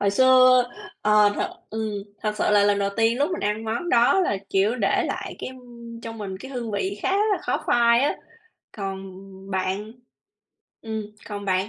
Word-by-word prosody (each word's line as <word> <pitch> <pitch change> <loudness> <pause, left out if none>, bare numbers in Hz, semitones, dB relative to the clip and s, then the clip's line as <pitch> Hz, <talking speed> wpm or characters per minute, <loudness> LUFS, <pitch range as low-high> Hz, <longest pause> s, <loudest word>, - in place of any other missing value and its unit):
Hồi 200 - +2
xưa, 255 +2 +6 0.4
ờ, 210 -1 +5
thật - - -1 0.2
ừm, 220 -1 -3 0.3
thật 210 -1 -1
sự - - +1
là 205 -1 +5
lần 205 0 +3
đầu 200 0 0
tiên 230 +2 +2
lúc 290 +5 +1
mình 360 - -3
ăn 210 +2 -1
món 230 +10 -3
đó 240 +8 +4
là, 205 - +1
kiểu, 200 +5 +2
để 210 -5 +1
lại - - -5
cái, - - -5
ưm, 235 -2 -11
trong 225 0 -8
mình 195 -3 -5
cái 265 - -9
hương 245 -4 -4
vị 200 0 -2
khá - - +1
là 415 0 +2
khó - - -1
phai 235 0 +4
á. 285 - +1 0.6
Còn 195 -2 -4 0.5
bạn? 190 +3 -2 0.9
Ừm, 220 -1 -4 0.3
còn 205 -1 -5
bạn 190 +1 0
220 Hz, 190 wpm, -24 LUFS, 200-240 Hz, 0.9 s, xưa